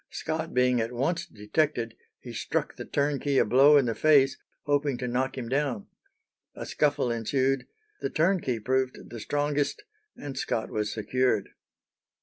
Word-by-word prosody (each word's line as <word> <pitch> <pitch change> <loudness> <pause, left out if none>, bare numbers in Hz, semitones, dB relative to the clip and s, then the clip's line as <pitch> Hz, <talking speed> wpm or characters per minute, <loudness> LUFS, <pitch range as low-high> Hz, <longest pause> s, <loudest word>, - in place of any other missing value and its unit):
Scott 160 0 -3
being 125 -1 +3
at 115 +1 -2
once 140 +8 -1
detected, 115 +2 -1 0.2
he - - -9
struck - - -2
the - - -7
turnkey 140 -1 0
a - - +5
blow 135 +6 +6
in 140 - +4
the 115 - 0
face, 135 -1 +4 0.3
hoping 145 -2 +1
to 125 0 -3
knock 130 +2 -1
him 120 -3 -4
down. 130 -4 -1 0.7
A - - -6
scuffle 145 -5 +1
ensued, 130 +3 0 0.3
the - - -2
turnkey 160 - +1
proved 130 +3 0
the 120 - -7
strongest, 145 - -1 0.3
and 140 -2 -7
Scott 115 -3 -2
was 105 0 -1
secured. 110 +1 0
130 Hz, 150 wpm, -27 LUFS, 120-145 Hz, 0.7 s, blow